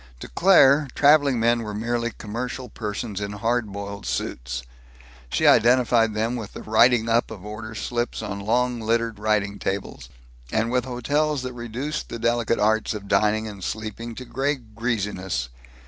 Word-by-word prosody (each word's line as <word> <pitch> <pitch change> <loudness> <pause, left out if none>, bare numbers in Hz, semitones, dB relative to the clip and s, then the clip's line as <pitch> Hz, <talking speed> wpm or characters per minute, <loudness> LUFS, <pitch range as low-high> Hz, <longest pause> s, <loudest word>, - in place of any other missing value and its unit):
To - - -6
Claire, 150 -6 +5
traveling 145 -3 +5
men 115 +1 +3
were 105 -2 -5
merely 115 +2 -1
commercial 125 +4 -5
persons 105 -1 -4
in 100 0 -4
hard 115 +1 -1
boiled 100 0 -6
suits. 60 0 -3 0.7
She - - 0
identified 115 -2 +4
them 115 +3 0
with 110 -4 -6
the - - -8
writing 115 +1 +4
up 115 +1 +2
of 105 -3 -9
order 110 +1 -7
slips 120 +2 -3
on 100 0 -4
long 120 +4 0
littered 115 -1 0
writing 105 -1 0
tables, 95 -10 -4 0.4
and 115 +1 0
with 125 -1 +1
hotels 145 +3 0
that 130 0 -5
reduced 125 +6 -4
the - - -5
delicate 115 0 +1
arts 110 +1 +1
of 100 -1 -7
dining 105 +2 +2
and 100 -3 -8
sleeping 110 +3 -5
to 130 - -8
gray 135 +5 0
greasiness. 105 - -3
115 Hz, 160 wpm, -24 LUFS, 105-125 Hz, 0.7 s, Claire